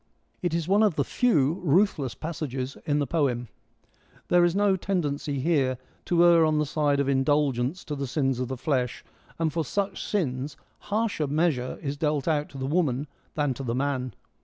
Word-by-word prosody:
It 175 Hz, -2 st, 0 dB
is 170 Hz, -1 st, -1 dB
one 200 Hz, +3 st, +4 dB
of 210 Hz, -7 st, +3 dB
the 140 Hz, -, +2 dB
few 165 Hz, -, +2 dB
ruthless 155 Hz, -, +2 dB
passages 140 Hz, -5 st, -4 dB
in 145 Hz, -1 st, +2 dB
the 145 Hz, -, +1 dB
poem: 125 Hz, -6 st, 0 dB, 0.8 s
there 175 Hz, 0 st, +5 dB
is 175 Hz, 0 st, +2 dB
no 200 Hz, -1 st, +3 dB
tendency 150 Hz, -7 st, -2 dB
here 135 Hz, -4 st, +1 dB, 0.3 s
to 175 Hz, 0 st, +4 dB
err 170 Hz, -1 st, +6 dB
on 155 Hz, -1 st, +2 dB
the 150 Hz, -, +2 dB
side 145 Hz, -1 st, +1 dB
of 140 Hz, -, +1 dB
indulgence 140 Hz, +2 st, +1 dB
to 150 Hz, -, -4 dB
the 140 Hz, -1 st, -3 dB
sins 135 Hz, -2 st, 0 dB
of 130 Hz, -, -1 dB
the 130 Hz, +1 st, -4 dB
flesh, 125 Hz, -2 st, -1 dB, 0.3 s
and 160 Hz, -2 st, 0 dB
for 165 Hz, 0 st, 0 dB
such 195 Hz, +7 st, -2 dB
sins 145 Hz, -7 st, -2 dB, 0.3 s
harsher 210 Hz, -7 st, 0 dB
measure 145 Hz, -4 st, 0 dB
is 145 Hz, 0 st, -3 dB
dealt 150 Hz, -2 st, 0 dB
out 150 Hz, -2 st, +1 dB
to 140 Hz, -, -10 dB
the 130 Hz, -, -3 dB
woman 145 Hz, -3 st, +1 dB, 0.3 s
than 145 Hz, -3 st, +1 dB
to 125 Hz, -, -8 dB
the 120 Hz, -3 st, -2 dB
man. 130 Hz, -2 st, -1 dB
150 Hz, 185 wpm, -26 LUFS, 135-170 Hz, 0.8 s, err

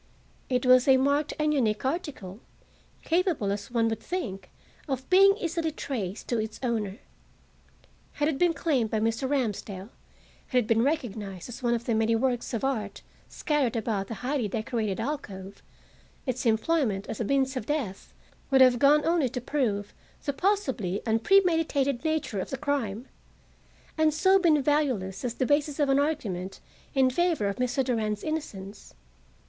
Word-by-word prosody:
It 250 Hz, -1 st, 0 dB
was 255 Hz, +1 st, +6 dB
a 265 Hz, -1 st, +7 dB
marked 280 Hz, +3 st, +1 dB
and 305 Hz, 0 st, +1 dB
unique 225 Hz, -5 st, 0 dB
article, 265 Hz, -, -4 dB, 0.6 s
capable, 330 Hz, -, +1 dB
as 200 Hz, 0 st, -4 dB
one 230 Hz, -2 st, +1 dB
would 225 Hz, -1 st, -3 dB
think, 200 Hz, -, -5 dB, 0.4 s
of 265 Hz, -2 st, -3 dB
being 390 Hz, +2 st, +7 dB
easily 335 Hz, -3 st, -1 dB
traced 225 Hz, -, -5 dB
to 235 Hz, -, +1 dB
its 220 Hz, 0 st, -4 dB
owner. 220 Hz, -5 st, -1 dB, 1.2 s
Had 295 Hz, -, 0 dB
it 310 Hz, -4 st, -1 dB
been 350 Hz, -2 st, +3 dB
claimed 265 Hz, -11 st, +1 dB
by 220 Hz, -, 0 dB
Mr. 225 Hz, +4 st, 0 dB
Ramsdell, 210 Hz, -7 st, -2 dB, 0.6 s
had 255 Hz, -, 0 dB
it 245 Hz, -, +3 dB
been 225 Hz, +1 st, +2 dB
recognized 225 Hz, -, -2 dB
as 245 Hz, -, -8 dB
one 240 Hz, -1 st, +2 dB
of 235 Hz, 0 st, -5 dB
the 235 Hz, -, 0 dB
many 225 Hz, +1 st, +2 dB
works 245 Hz, 0 st, 0 dB
of 230 Hz, -, -3 dB
art 220 Hz, -7 st, -2 dB, 0.3 s
scattered 290 Hz, -6 st, 0 dB
about 215 Hz, -3 st, -1 dB
the 225 Hz, -, -5 dB
highly 265 Hz, -4 st, 0 dB
decorated 220 Hz, -1 st, -2 dB
alcove, 200 Hz, -7 st, -5 dB, 0.6 s
its 255 Hz, -2 st, -1 dB
employment 220 Hz, -3 st, +1 dB
as -, -, -6 dB
a -, -, 0 dB
means 265 Hz, +3 st, +1 dB
of 235 Hz, -4 st, -4 dB
death 265 Hz, -11 st, -3 dB, 0.4 s
would 270 Hz, -2 st, +4 dB
have 250 Hz, -2 st, +6 dB
gone 295 Hz, +2 st, +5 dB
only 325 Hz, -5 st, +2 dB
to 250 Hz, -, -4 dB
prove 225 Hz, -6 st, -1 dB, 0.3 s
the 285 Hz, -, 0 dB
possibly 270 Hz, -, -1 dB
unpremeditated 285 Hz, -, +2 dB
nature 315 Hz, -10 st, -1 dB
of -, -, -4 dB
the 270 Hz, -, -3 dB
crime, 260 Hz, -5 st, -2 dB, 0.9 s
and 310 Hz, -1 st, +3 dB
so 380 Hz, +4 st, +4 dB
been 315 Hz, -6 st, +3 dB
valueless 255 Hz, -11 st, 0 dB
as 240 Hz, -2 st, -2 dB
the 260 Hz, -, 0 dB
basis 290 Hz, +1 st, +1 dB
of 290 Hz, -2 st, +2 dB
an 270 Hz, +1 st, +4 dB
argument 205 Hz, -, -2 dB, 0.4 s
in 265 Hz, -1 st, +5 dB
favor 340 Hz, -, +1 dB
of 200 Hz, -, -3 dB
Mr. 250 Hz, +1 st, 0 dB
Durand's 220 Hz, -4 st, -1 dB
innocence. 210 Hz, -11 st, -6 dB
255 Hz, 165 wpm, -27 LUFS, 220-295 Hz, 1.2 s, a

